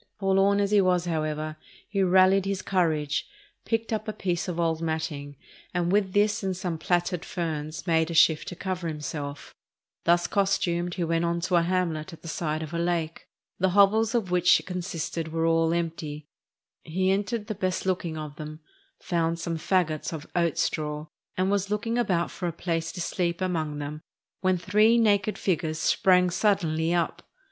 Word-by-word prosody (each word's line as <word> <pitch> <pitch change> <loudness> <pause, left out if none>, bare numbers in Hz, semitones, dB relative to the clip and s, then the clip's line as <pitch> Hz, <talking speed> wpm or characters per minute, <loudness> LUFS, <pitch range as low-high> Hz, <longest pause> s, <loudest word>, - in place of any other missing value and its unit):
Forlorn 195 0 +3
as 200 0 +1
he 205 -1 +5
was, 180 -2 +2
however, 155 -2 -2 0.3
he 200 -1 -1
rallied 190 +1 +5
his 195 -1 -2
courage, 155 -5 0 0.4
picked 225 0 -1
up 215 0 -2
a 215 - -2
piece 180 -3 -2
of 175 -2 -3
old 165 -1 0
matting, 160 -3 -3 0.4
and 175 0 +1
with 195 -2 +2
this 210 +2 +2
and 190 -2 -2
some 175 -3 -3
plaited 175 0 0
ferns 155 -3 -4
made 160 -2 +2
a 170 - -4
shift 160 -1 +5
to 180 - -5
cover 185 -1 -3
himself; 150 -2 -5 0.5
thus 175 +1 +4
costumed 175 -3 0
he 180 - -1
went 165 0 +1
on 170 0 0
to 180 +1 0
a 170 - +5
hamlet 170 -2 -1
at 165 - -13
the - - -8
side 155 -1 -2
of 155 +1 -8
a 170 - -1
lake; 170 -1 -2 0.3
the 190 +1 +3
hovels 220 +3 +5
of 205 -7 0
which 180 0 +5
it - - -12
consisted 175 -3 -4
were 165 +1 -1
all 165 0 +3
empty; 160 -3 -3 0.6
he 185 +3 0
entered 205 +3 -1
the 215 - -3
best 185 -2 -2
looking 175 -4 -1
of 150 -1 -7
them, 155 0 -7 0.4
found 165 -2 0
some 165 0 -3
fagots 160 -3 0
of 160 -2 -6
oat 170 -3 +1
straw, 150 0 -1 0.3
and 185 +1 +1
was 200 -1 0
looking 230 +3 -1
about 180 -7 +1
for 180 - -4
a - - -1
place 165 0 -2
to 180 - -8
sleep 170 0 -1
among 160 -5 -1
them, 150 +1 -5 0.4
when 185 -1 +2
three 210 +6 +4
naked 210 -2 +2
figures 160 -4 -1
sprang 180 +2 +3
suddenly 170 -5 +1
up. 175 -1 0
175 Hz, 180 wpm, -27 LUFS, 160-190 Hz, 0.6 s, he